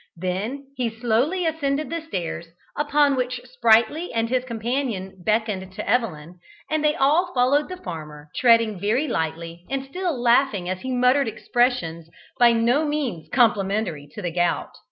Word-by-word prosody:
Then 195 +10 -3
he 245 -2 0
slowly 245 +11 0
ascended 305 -2 -1
the 335 0 -2
stairs, 175 - -5 0.3
upon 290 -1 +2
which 255 -1 -2
Sprightly 245 +5 +2
and 230 -1 -1
his 255 0 +1
companion 230 -5 -3
beckoned 210 -3 -1
to - - -6
Evelyn, 180 -8 -1 0.3
and 310 -1 +1
they 300 0 +3
all 335 +5 +2
followed 270 +5 +3
the 370 - -6
farmer, 155 - -8
treading 230 -5 +4
very 225 - +1
lightly, 165 - -3
and 270 0 -2
still 340 0 -3
laughing 240 -6 +2
as 185 0 -3
he 260 - -4
muttered 250 +1 +3
expressions 220 -10 -1 0.3
by 240 -1 +7
no 235 +6 +2
means 285 - -3
complimentary 200 - +1
to - - -7
the 175 - -2
gout. 175 0 0
235 Hz, 155 wpm, -23 LUFS, 185-275 Hz, 0.3 s, by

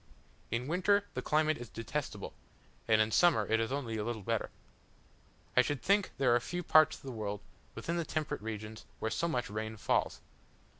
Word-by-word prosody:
In 120 +2 -1
winter 200 +5 +3
the - - -3
climate 155 -1 +2
is 120 -2 -8
detestable, 115 -3 -4 0.5
and 110 -1 +5
in 110 0 +3
summer 140 -11 +4
it 110 +2 +2
is 115 +2 -1
only 125 -5 -2
a 105 - -1
little 115 -2 -3
better. - - -1 1.1
I 125 - +8
should 135 -1 -2
think 200 0 +3
there 130 -3 +4
are - - +4
few 175 +8 -4
parts 155 -1 +6
of - - -20
the 135 - -5
world, 105 -3 -3 0.4
within 170 +1 -2
the 170 - 0
temperate 155 -6 -3
regions, 110 0 -6
where 110 - -2
so 170 - 0
much 125 -7 -1
rain 110 +1 -4
falls. - - 0
120 Hz, 190 wpm, -33 LUFS, 110-155 Hz, 1.1 s, I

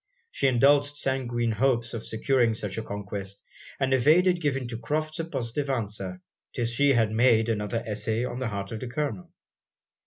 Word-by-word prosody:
She 135 - +1
indulged 140 +3 +4
sanguine 120 -4 -1
hopes 120 +1 +1
of 115 -1 -4
securing 115 0 +1
such 105 -3 -4
a - - -3
conquest; 100 -1 -6 0.4
and 135 -1 +1
evaded 170 +7 +4
giving 135 -4 -1
to 115 -2 -5
Crofts 155 +6 -2
a 165 - -1
positive 140 -2 -3
answer, 100 -7 -3 0.3
till 120 - -1
she 140 +5 +3
had 115 -3 +2
made 115 0 +4
another 110 +1 -1
essay 110 +2 -1
on 125 0 -5
the 130 - -2
heart 100 -3 -4
of 110 - -4
the 125 - -5
Colonel. 120 -7 -3
120 Hz, 175 wpm, -27 LUFS, 110-135 Hz, 0.4 s, indulged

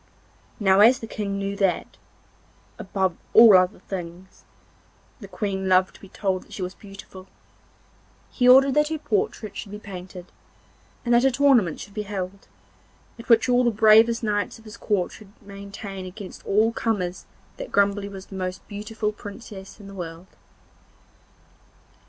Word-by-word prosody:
Now 195 -2 +4
as 235 +5 +7
the - - -8
King 205 -3 -4
knew 200 0 -3
that, 195 -3 0 0.8
above 190 -2 -1 0.2
all 225 -3 +9
other 185 +2 +3
things, 180 0 -9 0.7
the 200 - -10
Queen 190 0 -3
loved 185 0 +3
to - - -18
be 195 - -13
told 190 -2 -2
that - - -16
she 190 - -5
was 180 +1 -5
beautiful, 195 -2 -13 1.0
he 250 -1 +3
ordered 270 +1 +7
that 300 +1 +3
her 315 0 -3
portrait 215 -5 -2
should 210 - -7
be 210 - -6
painted, 185 -3 -10 0.7
and 240 - +2
that 240 +1 +5
a 270 - +5
tournament 250 - +3
should 200 - -10
be 210 - -3
held, 195 -1 -6 0.7
at 230 - -12
which 230 0 +5
all 250 0 +3
the 240 - +3
bravest 225 +2 +5
knights 205 -3 -1
of 225 - -19
his 215 +1 -10
court 205 -6 -1
should 205 -2 -14
maintain 200 -1 -8
against 185 +1 -10
all 215 +3 +3
comers 190 -6 -2 0.3
that - - -7
Grumbly 200 0 +1
was 195 -1 -9
the 195 - -11
most 185 0 -5
beautiful 210 +1 -4
princess 205 -1 -11
in 205 - -12
the 195 - -10
world. 170 -2 -7
200 Hz, 160 wpm, -24 LUFS, 190-225 Hz, 1.0 s, all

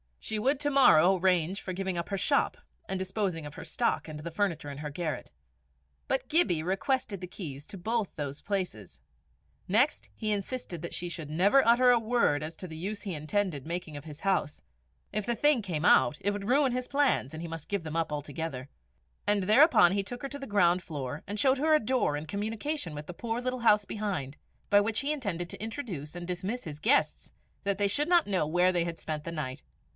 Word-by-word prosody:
She 220 - -2
would 270 +5 +1
to 290 0 +1
morrow 195 - +6
arrange 180 0 +1
for 185 - -5
giving 190 -1 -2
up 170 - -3
her 200 - -1
shop - - +1 0.3
and 190 - -1
disposing 185 -3 -2
of 145 - -9
her 185 - -8
stock 165 - -1
and 155 -1 -7
the 170 +2 -6
furniture 165 -5 -1
in 140 0 -7
her 150 -1 -4
garret. 155 -2 -4 0.8
But 265 - 0
Gibbie 180 - +2
requested 200 - -1
the 180 - -5
keys 150 -3 -8
of 185 -3 -9
both 225 -2 -1
those 145 -1 -5
places. 180 - -4 0.7
Next, 235 +10 +2
he 215 -2 -1
insisted 200 -4 -3
that 170 - -6
she 175 - -2
should 160 -3 -6
never 200 - +4
utter 245 +2 +6
a 240 - +5
word 225 -10 +2
as 160 +2 -6
to 185 - -6
the 160 -2 -8
use 200 +5 -4
he 195 -4 -4
intended 155 -1 -1
making 170 -3 -4
of 145 - -10
his 150 -1 -10
house; 190 -6 0 0.5
if 215 -1 -2
the 240 - 0
thing 290 +1 +4
came 175 -5 -3
out, 150 - +5
it 205 - +1
would 205 0 -5
ruin 270 +1 +3
his 250 0 -2
plans, 275 - +1
and 160 - -6
he - - -4
must 165 -2 -7
give 200 -4 -1
them 160 0 -6
up 165 -2 0
altogether 145 -2 -5 0.6
and 205 -1 +4
thereupon 215 - +6
he 200 0 0
took 245 +5 -7
her 275 - -3
to 285 - -7
the 275 - -7
ground 180 -3 +3
floor 145 -4 -5
and 205 +1 -3
showed 265 +2 +4
her 310 +2 +4
a - - +4
door 245 - +1
in 150 - -6
communication 210 - -3
with 150 +2 -8
a - - -4
poor 230 +5 -3
little 255 0 -2
house 210 -3 +4
behind, 190 -12 -3 0.3
by 205 - +6
which 210 +1 0
he 285 +2 -1
intended 190 - -3
to - - -7
introduce 210 - -5
and 175 0 -6
dismiss 185 +7 -3
his 150 -2 -7
guests, 260 - +1 0.3
that 200 -1 0
they 205 - +3
should 290 +9 +1
not 345 -2 +4
know 185 -6 +1
where 175 +3 +3
they 175 -2 +1
had 170 -1 -4
spent 155 -1 -4
the 170 - -5
night. 140 -5 -5
190 Hz, 220 wpm, -29 LUFS, 160-225 Hz, 0.8 s, morrow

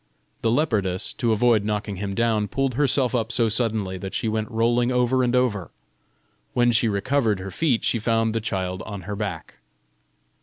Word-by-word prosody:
The 115 - +1
leopardess, 110 - 0
to 120 -2 +1
avoid 110 -1 +3
knocking 105 -1 -2
him 100 0 -4
down, 110 -2 +1
pulled 135 +5 -1
herself 130 -1 +2
up 115 -2 0
so 115 -3 +2
suddenly 110 -5 -1
that 95 +1 -6
she - - -1
went 110 0 -1
rolling 120 +2 +1
over 125 +1 +2
and 125 0 +1
over: 110 -9 0 0.9
when 120 0 +4
she 115 0 +3
recovered 110 +1 +1
her 95 +1 -6
feet 130 - +1
she 115 - +1
found 115 0 +1
the 115 - -1
child 95 -3 -3
on 100 -3 -6
her 100 +4 -5
back. 100 -6 -5
115 Hz, 180 wpm, -24 LUFS, 100-120 Hz, 0.9 s, when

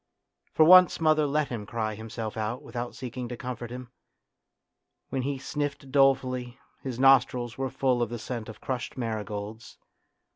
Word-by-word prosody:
For 155 - +5
once 185 +2 +8
mother 155 -2 +3
let 150 +1 0
him 110 -4 -5
cry 110 -1 -2
himself 110 0 -6
out 110 +3 -3
without 120 0 -5
seeking 125 -1 -6
to 120 - -6
comfort 120 -1 -6
him; 125 0 -8 1.2
when 135 - -1
he 140 +2 -2
sniffed 140 -1 -4
dolefully, 130 -2 +2 0.2
his 130 -3 -5
nostrils 125 -3 +4
were 135 0 -2
full 130 -2 +1
of 120 - 0
the 120 - -4
scent 115 0 -6
of 110 - -10
crushed 130 0 -4
marigolds. 110 -1 -5
125 Hz, 155 wpm, -27 LUFS, 115-135 Hz, 1.2 s, once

